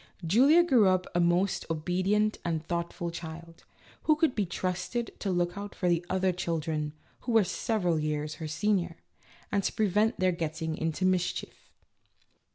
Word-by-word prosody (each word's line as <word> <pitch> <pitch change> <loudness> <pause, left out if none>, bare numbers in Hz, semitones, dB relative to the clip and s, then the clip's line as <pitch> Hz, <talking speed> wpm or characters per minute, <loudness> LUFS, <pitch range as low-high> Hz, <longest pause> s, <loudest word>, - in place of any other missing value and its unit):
Julia 270 - +6
grew 245 - +4
up 185 -1 +2
a 175 - +1
most 175 +3 +1
obedient 185 +6 0
and 160 -2 -2
thoughtful 170 0 -3
child, 165 0 -9 0.4
who 310 - +5
could 310 -4 +2
be 205 -4 -1
trusted 185 +7 -3
to 200 - -2
look 175 -1 0
out 200 0 -7
for 180 - -1
the 170 -1 +2
other 190 0 +2
children, 160 -3 -2 0.3
who 240 - -3
were 225 -2 +6
several 180 -3 0
years 150 0 -2
her 160 - -3
seniors, 175 +1 0 0.5
and 200 -1 +1
to - - 0
prevent 215 +2 +1
their 185 0 +3
getting 160 -1 -3
into 160 +3 -1
mischief. 185 -1 -1
180 Hz, 160 wpm, -29 LUFS, 165-205 Hz, 0.5 s, Julia